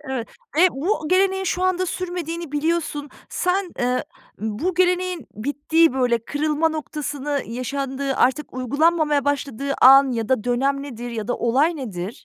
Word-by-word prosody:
Evet. 265 -5 -4 0.3
Ve 365 +3 +6
bu 315 +3 -2
geleneğin 385 +1 +2
şu 365 0 -1
anda 370 0 +1
sürmediğini 345 -3 -4
biliyorsun. 295 -1 -1 0.2
Sen, 365 0 -1
eee, 250 +2 0 0.3
bu 220 - -2
geleneğin 360 -4 +1
bittiği, 290 +7 +2
böyle, 245 -3 +1
kırılma 300 +3 0
noktasını 295 -2 -3
yaşandığı, 270 +3 -3
artık 265 +4 +1
uygulanmamaya 295 +3 +2
başladığı 280 -1 -1
an 270 0 +8
ya 225 -2 -2
da 255 -5 +1
dönem 275 +3 0
nedir 245 -3 -7
ya 225 -1 -5
da 245 - 0
olay 280 +8 +2
nedir? 195 -8 -5
285 Hz, 140 wpm, -22 LUFS, 255-335 Hz, 0.3 s, an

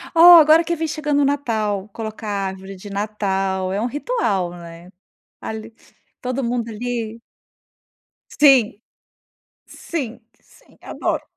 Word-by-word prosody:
Oh, 345 +1 +10
agora 315 +2 +6
que 340 +1 -2
vem 320 0 -2
chegando 300 -1 -1
o - - +3
Natal, 220 -8 -1
colocar 220 -1 -7
a 200 -2 -2
árvore 190 +1 -8
de 190 +2 -11
Natal 195 -2 -2
é 195 - -1
um 235 - 0
ritual, 250 - -1
né. 170 0 -12 0.5
Ali 220 0 -7 0.5
todo 255 +1 -3
mundo 235 -1 -2
ali 230 0 -4 1.1
Sim! 270 -7 +5 0.9
Sim, 255 -8 -6 0.2
sim, - - -24
adoro. - - -3
225 Hz, 125 wpm, -20 LUFS, 195-285 Hz, 1.1 s, Oh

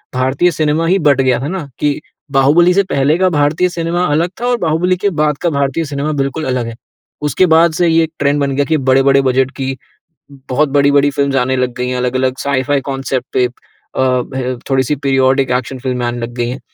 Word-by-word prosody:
भारतीय 130 +7 +1
cinema 155 0 0
he 190 - +3
but 145 -4 +3
गया 130 -2 +2
है 140 +4 -4
ना 175 -6 -5
कि 145 0 0 0.3
बाहुबली 150 +6 +4
से 200 +2 +3
पहले 140 +4 +2
का 185 0 +2
भारतीय 155 +3 +1
सिनेमा 170 0 -2
अलग 160 +3 +1
था, - - -1
और 245 0 +1
बाहुबली 175 0 +1
के 200 +3 0
बाद 150 -4 0
का 175 - +1
भारतीय 140 +2 -1
सिनेमा 145 +1 -3
बिल्कुल 140 +4 -3
अलग 125 -2 -1
है। 115 - -7 0.5
उसके 150 +5 +2
बाद 165 +1 +4
से 175 +2 +1
ये 165 0 +3
ट्रेंड 145 0 +1
बन 140 -1 0
गया 145 - +1
कि 160 +1 +1
बड़े-बड़े 135 0 +3
बजट 130 0 +1
की 135 -1 -3 0.7
बहुत 140 +3 +1
बड़-बड़ी 140 0 +3
फ़िल्म्स 140 0 -1
आने 130 +1 +1
लग 125 -1 -1
गई 125 0 -2
हैं। 125 - -2
अलग-अलग 130 +1 -1
साइ-फाई 140 0 0
कांसेप्ट 135 -1 -3
पे 125 - +3
अ, - - -17 0.7
ब, 130 -1 -4
थोड़ी-सी 135 +1 +1
पीरियोडिक 135 -1 +1
एक्शन 125 +1 -2
फ़िल्में 125 -1 -2
आने 120 0 -3
लग 120 0 -5
गई 120 - -1
हैं। 130 - -5
140 Hz, 210 wpm, -15 LUFS, 130-160 Hz, 0.7 s, बाहुबली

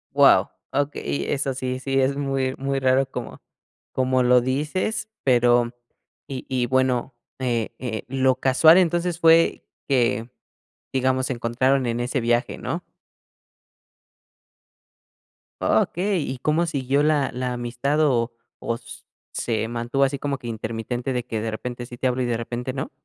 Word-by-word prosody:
Guau, - - +6 0.2
okey, 70 - -1
eso 135 -2 -1
sí 130 -1 -3
sí 135 +1 0
es 135 +1 +2
muy 135 -2 -1
muy 135 0 -1
raro 130 0 +3
como - - -7 0.5
como 130 0 +2
lo 125 0 +5
dices, 150 - -1
pero 120 -2 +3 0.5
y 130 -2 -6
y 125 -2 0
bueno, 130 -1 +1 0.2
eh 120 -4 -1
eh, 115 -4 -4
lo 130 0 +2
casual, 155 +6 +6
entonces, 175 -1 +1
fue 165 0 +4 0.2
que 120 -3 +1 0.6
digamos, 130 0 +1
se 130 - -2
encontraron 125 +3 +1
en 120 0 -1
ese 125 +2 -1
viaje, 120 +1 0
¿no? - - -4 2.8
O - - +4
okey, 185 -1 -1
¿y 130 - -4
cómo 155 +5 +1
siguió 140 -2 0
la 150 -2 +2
la 125 0 -2
amistad, 125 +5 -1
o 125 -5 +2 0.3
o 115 - -2
s - - -11 0.3
se 110 -2 -1
mantuvo 120 +4 -1
así 135 0 0
como 140 -1 -2
que 120 - -9
intermitente 115 +3 -3
de 125 -1 -2
que 110 -3 -3
de 115 - -2
repente 120 +2 -5
sí 120 0 -10
te 130 - 0
hablo, 125 0 0
y - - +1
de 120 -2 0
repente 120 +2 -4
no? 135 0 -4
130 Hz, 155 wpm, -23 LUFS, 120-135 Hz, 2.8 s, Guau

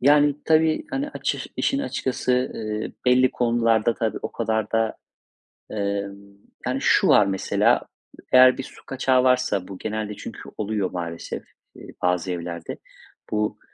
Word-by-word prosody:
yani, 145 +2 +5
tabii, 160 0 +3
hani, 275 +2 -2
açış - - -3
işin 275 - +1
açıkçası, 125 - -1
ııı, 110 -1 -4
belli 125 0 +5
konularda 115 -2 +2
tabii 110 -2 -2
o - - -4
kadar 110 -2 -1
da, 115 0 +1 0.8
ımm 100 -1 -4 0.3
Yani - - -1
şu - - +4
var 105 - +6
mesela: 95 -1 +2 0.5
Eğer 130 0 +7
bir 135 - -2
su - - -14
kaçağı 130 -1 +2
varsa, 125 -7 +2
bu 95 -2 -8
genelde 110 -1 -3
çünkü - - -8 0.2
oluyor 105 -2 -1
maalesef, 85 -2 -5 0.3
iii, - - -12
bazı 90 0 +1
evlerde, 85 -1 -5 0.5
bu, 105 0 -1
110 Hz, 140 wpm, -24 LUFS, 100-130 Hz, 0.8 s, Eğer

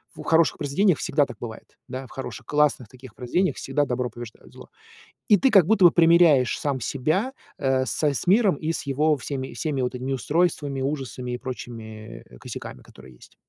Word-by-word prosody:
В - - -9
хороших 165 0 +3
произведениях 160 +5 +1
всегда 145 0 +1
так - - -11
бывает. 110 -2 -10
Да, 130 +1 -6
в - - -20
хороших, 135 - -7
классных 150 -5 +1
таких 130 0 -15
произведениях 175 +10 -1
всегда 145 +2 -1
добро 125 -1 -2
побеждает 120 -2 -11
зло. - - -13 0.6
И 210 - +7
ты 265 - +2
как 195 -8 +6
будто 205 -2 +3
бы 175 - +9
примиряешь 165 -7 +4
сам 140 -3 -2
себя, 175 - -1 0.3
э, 130 -1 +1
с - - -3
с 145 +1 0
миром 200 0 +4
и 160 +3 -2
с 150 - -5
его 150 +3 +2
всеми 130 0 -5
всеми 145 -5 -2
вот 125 +1 -2
этими 130 +2 -4
устройствами, 145 -1 0
ужасами 130 -3 -4
и 125 - -3
прочими, 115 -3 -8
э, - - -15
косяками, - - -8
которые 65 - -16
есть. - - -19
140 Hz, 190 wpm, -24 LUFS, 125-165 Hz, 0.6 s, бы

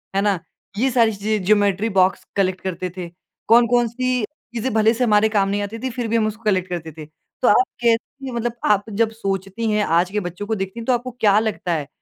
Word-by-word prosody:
है 195 - +3
ना? 200 -3 +1 0.4
ये 260 +5 +2
सारी 230 -3 +4
चीज़ें, 210 0 -1
ज्योमेट्री 205 +1 +2
बॉक्स 185 +1 +2
कलेक्ट 190 -2 0
करते 185 -1 -4
थे। 175 -2 -5 0.4
कौन-कौन 240 +1 +4
सी 250 0 -1
चीज़ें 240 -3 -6
भले 220 +1 +4
से 245 +2 -1
हमारे 215 -2 +4
काम 200 -2 +1
नहीं 205 +1 -1
आती 205 +3 -5
थीं 260 +3 -3
फिर 240 -1 -3
भी 225 - -1
हम 220 -1 +2
उसको 215 +1 -7
कलेक्ट 185 -4 +1
करते 165 -2 -5
थे। 155 0 -10 0.4
तो 250 - +3
आप 245 - +6 0.2
कैसी 240 +3 0
मतलब 235 0 -2
आप 205 -1 +3
जब 220 +2 +1
सोचती 195 +1 -3
हैं, 210 0 +2
आज 175 +2 +1
के 210 - 0
बच्चों 180 +2 -6
को 220 - 0
देखती 195 +2 -5
हैं 230 - -7
तो 255 - +2
आपको 245 +1 -2
क्या 205 -1 +4
लगता 215 -5 -2
है, 150 -4 -2
215 Hz, 230 wpm, -21 LUFS, 195-230 Hz, 0.4 s, आप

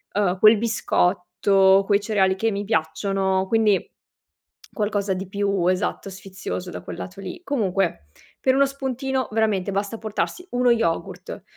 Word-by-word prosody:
uhm, 190 -2 +1
quel 215 0 +7
biscotto, 195 -2 +2
quei 200 0 +2
cereali 195 -3 +2
che 225 +3 0
mi 200 0 -3
piacciono, 190 +1 0
quindi 215 -2 +2 0.8
qualcosa 205 -2 -1
di 185 0 -5
più, 200 -2 0
esatto, 185 +1 -1
sfizioso 190 -1 -6
da - - -7
quel - - -8
lato 195 +2 -8
lì. 190 - -7
Comunque 195 - -1 0.3
per 260 0 +3
uno 275 - +5
spuntino 265 -2 -3
veramente 210 -3 0
basta 200 +3 -2
portarsi 220 - -3
uno 245 0 +3
yogurt. 225 -8 -2
200 Hz, 140 wpm, -23 LUFS, 190-225 Hz, 0.8 s, quel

